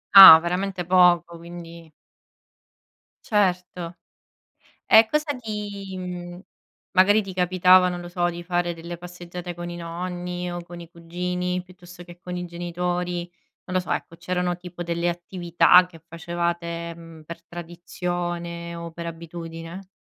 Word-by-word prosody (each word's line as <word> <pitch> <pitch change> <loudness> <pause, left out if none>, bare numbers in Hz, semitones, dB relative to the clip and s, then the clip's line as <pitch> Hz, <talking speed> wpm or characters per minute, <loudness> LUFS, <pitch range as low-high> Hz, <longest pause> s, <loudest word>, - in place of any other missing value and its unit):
Ah, 190 -5 +14
veramente 180 +2 -2
poco, 175 -1 +4
quindi 170 -1 -11 1.3
Certo, 180 -4 0 0.9
e 220 0 +7
cosa 300 -1 0
ti 205 -4 -6
mhmm, 175 -1 -7 0.5
magari 205 +3 +5
ti 195 -2 -8
capitava, 185 0 +5
non 175 -1 -4
lo 175 - -8
so, 175 0 0
di 175 0 -8
fare 175 0 0
delle 170 +1 -8
passeggiate 175 0 -8
con 175 0 -7
i 175 - -6
nonni 175 +1 -5
o 175 0 -5
con 175 0 -11
i 170 -1 -10
cugini, 180 +2 -3
piuttosto 180 -1 -14
che 175 0 -14
con 180 0 -6
i 180 - -4
genitori, 175 0 -3 0.4
non 180 - -6
lo 185 - +3
so, 175 - -9
ecco, - - -3
c'erano 180 +1 -2
tipo 175 0 -8
delle 170 0 -1
attività 175 +1 +4
che 165 -2 -15
facevate, 170 0 -3
mhmm, 165 -1 -13
per 170 +2 -9
tradizione 175 0 -5
o 170 0 -7
per 170 +1 -7
abitudine? 165 +2 -8
175 Hz, 140 wpm, -24 LUFS, 170-180 Hz, 1.3 s, Ah